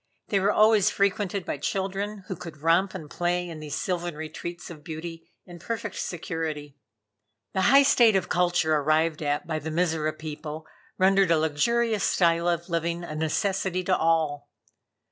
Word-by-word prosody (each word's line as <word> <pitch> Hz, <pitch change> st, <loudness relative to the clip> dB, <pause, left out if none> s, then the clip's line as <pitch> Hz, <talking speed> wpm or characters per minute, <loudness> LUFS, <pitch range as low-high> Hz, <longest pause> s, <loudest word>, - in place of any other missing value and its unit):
They 200 Hz, -, +2 dB
were 195 Hz, +2 st, +2 dB
always 215 Hz, -1 st, +5 dB
frequented 200 Hz, -1 st, 0 dB
by -, -, -3 dB
children, 195 Hz, +5 st, -3 dB
who 190 Hz, -, -4 dB
could 165 Hz, -2 st, -9 dB
romp 180 Hz, +4 st, +3 dB
and 160 Hz, -5 st, -7 dB
play 175 Hz, +3 st, -1 dB
in 165 Hz, -2 st, -8 dB
these 150 Hz, -2 st, -5 dB
sylvan 175 Hz, -3 st, -2 dB
retreats 160 Hz, +3 st, -7 dB
of 155 Hz, -3 st, -11 dB
beauty 165 Hz, +1 st, -7 dB, 0.2 s
in 175 Hz, -2 st, -11 dB
perfect 210 Hz, +2 st, -4 dB
security. 160 Hz, -4 st, -4 dB, 0.8 s
The 190 Hz, -, +1 dB
high 275 Hz, +2 st, +7 dB
state 235 Hz, -5 st, +5 dB
of 185 Hz, -2 st, +1 dB
culture 175 Hz, -3 st, +2 dB
arrived 155 Hz, +2 st, +1 dB
at 145 Hz, -1 st, -1 dB
by 155 Hz, -1 st, -2 dB
the 155 Hz, +2 st, -5 dB
Mizora 160 Hz, -2 st, 0 dB
people 155 Hz, 0 st, -7 dB, 0.3 s
rendered 195 Hz, 0 st, +4 dB
a 165 Hz, -, +4 dB
luxurious 210 Hz, +9 st, +1 dB
style 170 Hz, -1 st, +2 dB
of 170 Hz, 0 st, -1 dB
living 170 Hz, 0 st, -2 dB
a 165 Hz, -, -6 dB
necessity 185 Hz, +3 st, -1 dB
to 185 Hz, 0 st, +2 dB
all. 155 Hz, -3 st, 0 dB
170 Hz, 165 wpm, -26 LUFS, 155-190 Hz, 0.8 s, high